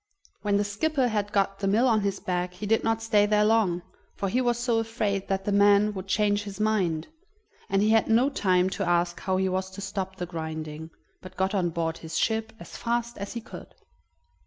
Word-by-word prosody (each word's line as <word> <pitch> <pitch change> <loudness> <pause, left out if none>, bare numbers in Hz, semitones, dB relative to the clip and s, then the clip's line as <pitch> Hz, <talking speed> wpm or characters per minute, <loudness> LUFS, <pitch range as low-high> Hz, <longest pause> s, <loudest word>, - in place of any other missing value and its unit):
When 205 -1 +1
the 205 - +2
skipper 255 +6 0
had 205 -2 -1
got 195 -1 0
the 195 - -1
mill 220 +6 +3
on 220 -3 +3
his 200 -1 -1
back 180 0 -2
he 210 - -6
did 225 +2 +2
not 225 0 0
stay 210 -2 +3
there 210 0 +3
long, 205 -6 +2 0.3
for 195 - -2
he 250 +6 +1
was 240 -2 +1
so 240 -1 +1
afraid 215 -4 -2
that 195 0 -2
the 205 - 0
man 205 +1 +4
would 190 -1 -6
change 205 +1 +2
his 205 0 -8
mind, 190 -7 0 0.6
and 195 +1 +2
he 215 - +3
had 225 -1 +4
no 240 +5 +3
time 185 -7 +2
to 195 - -2
ask 175 0 +1
how 190 -1 -1
he 190 0 +1
was 190 0 -2
to 190 +1 -10
stop 190 -1 -4
it 180 - -3
grinding, 160 -1 -5 0.3
but 185 - -12
got 190 +1 0
on 185 -4 +1
board 165 0 -2
his 160 -1 -5
ship 220 0 0
as - - -11
fast 235 0 -2
as 200 0 -5
he 235 - -5
could. - - -11
200 Hz, 220 wpm, -26 LUFS, 185-220 Hz, 0.6 s, man